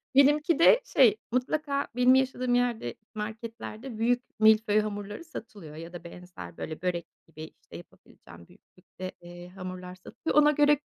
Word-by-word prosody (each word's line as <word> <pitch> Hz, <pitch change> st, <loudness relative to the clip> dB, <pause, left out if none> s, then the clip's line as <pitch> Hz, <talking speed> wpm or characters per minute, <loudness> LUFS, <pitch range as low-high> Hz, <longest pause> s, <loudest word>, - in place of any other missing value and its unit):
Benimki 295 Hz, +4 st, +4 dB
de, 465 Hz, +8 st, +7 dB
şey, 425 Hz, -, +4 dB
mutlaka 280 Hz, +3 st, -1 dB
benim 250 Hz, +1 st, +5 dB
yaşadığım 255 Hz, -2 st, +1 dB
yerde 240 Hz, -, 0 dB, 0.2 s
marketlerde 220 Hz, +2 st, -7 dB
büyük 245 Hz, +2 st, +1 dB, 0.2 s
milföy 215 Hz, -1 st, +5 dB
hamurları 205 Hz, +4 st, -4 dB
satılıyor 210 Hz, -, -10 dB
ya 165 Hz, +2 st, -9 dB
da 175 Hz, -, -8 dB
benzer 175 Hz, -, -11 dB
böyle 155 Hz, +1 st, -6 dB
börek 175 Hz, -2 st, -2 dB, 0.2 s
gibi, 155 Hz, -1 st, -10 dB, 0.2 s
işte, -, -, -11 dB
yapabileceğim 85 Hz, 0 st, -16 dB
büyüklükte, 185 Hz, 0 st, -11 dB
eee, 175 Hz, 0 st, -11 dB
hamurlar 185 Hz, -1 st, -8 dB
satılıyor. 185 Hz, -, -5 dB
Ona 295 Hz, -, +5 dB
göre, 295 Hz, -1 st, +4 dB
215 Hz, 145 wpm, -28 LUFS, 180-255 Hz, 0.2 s, de